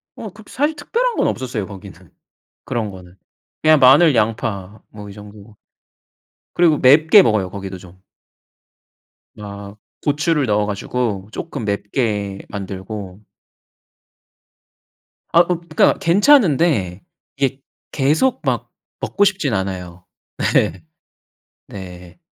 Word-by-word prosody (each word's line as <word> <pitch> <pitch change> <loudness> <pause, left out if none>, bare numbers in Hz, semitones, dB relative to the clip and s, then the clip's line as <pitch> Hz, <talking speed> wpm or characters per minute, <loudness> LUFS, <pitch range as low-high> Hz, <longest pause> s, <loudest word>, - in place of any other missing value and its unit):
어. 220 - -7
그렇게 210 +3 -16
사실 295 +3 0
특별한 470 +11 -1
건 - - +1
없었어요 120 -6 -3
거기는. 95 -4 -12 0.6
그런 110 -3 -3
거는. 90 -1 -13 0.5
그냥 155 -1 +5
마늘 140 +5 +6
양파 105 -3 -2
뭐 105 -1 -11
이 - - -10
정도. 105 +1 -14 1.0
그리고 165 -3 +3
맵게 155 +10 +6
먹어요 105 - +1
거기도 95 -1 -7
좀. 90 0 -16 1.4
아. 100 -1 -9 0.3
고추를 150 0 +1
넣어 105 -2 +1
가지고 105 -1 -3
쪼끔 145 -8 -5
맵게 100 -1 -2
만들고 95 0 -7 2.1
아. 170 +1 +6
그 175 -1 -1
그러니까 155 - +4
괜찮은데 170 - +3 0.3
이게 135 -1 -1 0.3
계속 155 - +1
막 - - -2 0.3
먹고 205 - +1
싶진 190 - 0
않아요. 95 -2 -4 0.5
예. 85 +1 +1 0.9
네. 90 - -10
110 Hz, 225 characters per minute, -19 LUFS, 100-155 Hz, 2.1 s, 마늘